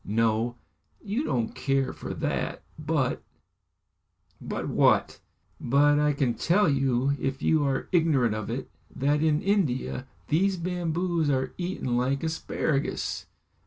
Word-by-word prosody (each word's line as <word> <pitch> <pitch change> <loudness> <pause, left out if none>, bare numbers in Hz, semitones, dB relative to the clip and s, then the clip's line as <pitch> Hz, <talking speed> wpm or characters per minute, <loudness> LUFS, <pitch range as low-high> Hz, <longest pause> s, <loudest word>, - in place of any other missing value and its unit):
No! 115 +2 +1 0.4
you 215 +7 -2
don't 120 - -1
care 135 0 0
for - - -6
that. - - -2 0.2
But - - 0 0.6
" - - -42
"But - - -3
what?" - - +3 0.4
"But 145 +3 +3
I 150 0 +3
can 135 -4 +1
tell 180 - +2
you, 135 -1 +2
if 135 0 -3
you 155 -2 +3
are 135 -1 -1
ignorant 150 -10 +3
of 110 -1 -4
it, 120 +4 -4 0.2
that 145 +2 +1
in 155 -1 +2
India 150 -10 0 0.2
these 185 +5 +2
bamboos 170 -2 -1
are 130 -2 0
eaten 175 -9 -2
like 135 +4 0
asparagus." 160 -3 -2
140 Hz, 130 wpm, -27 LUFS, 130-165 Hz, 0.6 s, what